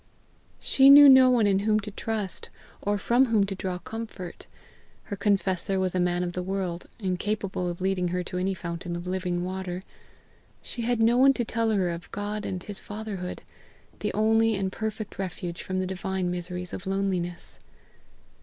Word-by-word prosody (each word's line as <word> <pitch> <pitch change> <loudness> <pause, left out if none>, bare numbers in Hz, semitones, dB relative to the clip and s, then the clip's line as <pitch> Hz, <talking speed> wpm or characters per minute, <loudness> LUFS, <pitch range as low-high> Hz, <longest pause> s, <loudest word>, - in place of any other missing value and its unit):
She 270 0 +5
knew 285 +1 +11
no 260 -1 +8
one 240 -4 +4
in 195 -1 +3
whom 215 +1 +2
to 210 +1 -7
trust, 210 -2 -3 0.3
or 205 0 0
from 240 +6 +3
whom 220 -3 +3
to 195 - -3
draw 185 -1 -3
comfort; 215 -3 -8 0.6
her 200 - -5
confessor 195 -2 +1
was 185 -1 0
a 185 - 0
man 175 0 +1
of 175 - -2
the 180 - -3
world, 180 -2 -3
incapable 190 -2 -2
of 175 +1 -6
leading 185 -1 0
her 180 +1 -1
to 180 +1 -4
any 190 +1 0
fountain 170 0 -5
of 175 +1 -6
living 180 -1 -2
water; 185 0 -4 0.8
she 240 - -6
had 240 0 0
no 230 +2 +4
one 270 +2 +6
to 240 -3 -2
tell 225 0 0
her 190 -5 +1
of 170 0 -7
God 205 +1 -4
and 185 -1 -4
his 205 -2 -7
fatherhood, 205 -4 -6 0.6
the - - -1
only 225 +1 +3
and 195 -1 -1
perfect 215 0 -5
refuge 175 -2 -4
from 185 - -3
the 185 - 0
divine 190 -1 -2
miseries 180 0 -5
of 190 - -6
loneliness. 190 -3 -2
190 Hz, 180 wpm, -27 LUFS, 180-215 Hz, 0.8 s, knew